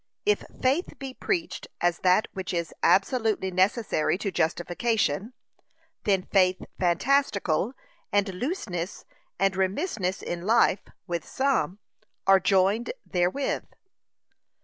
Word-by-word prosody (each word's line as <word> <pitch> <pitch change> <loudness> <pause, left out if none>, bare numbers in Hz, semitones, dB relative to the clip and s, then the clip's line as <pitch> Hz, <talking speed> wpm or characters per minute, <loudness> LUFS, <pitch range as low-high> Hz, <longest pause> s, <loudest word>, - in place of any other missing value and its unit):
If 420 0 +2 0.2
faith 275 +8 0
be 270 -2 -6
preached 340 +3 -2
as 175 -1 +1
that 185 +3 +3
which 185 -2 -4
is 170 -1 -2
absolutely 215 -2 +2
necessary 185 -2 +1
to 200 0 -3
justification, 185 - 0 0.7
then 195 -3 +2
faith 185 -1 +3 0.2
fantastical, 200 - +1 0.4
and 200 -1 +1
looseness 185 - -4 0.3
and 195 0 +2
remissness 190 - -1
in 175 0 -4
life, 220 -3 +4 0.2
with 170 -3 -3
some, 255 - 0 0.5
are 195 0 +6
joined 195 +4 +2
therewith. 180 +10 0
195 Hz, 105 wpm, -27 LUFS, 180-235 Hz, 0.7 s, are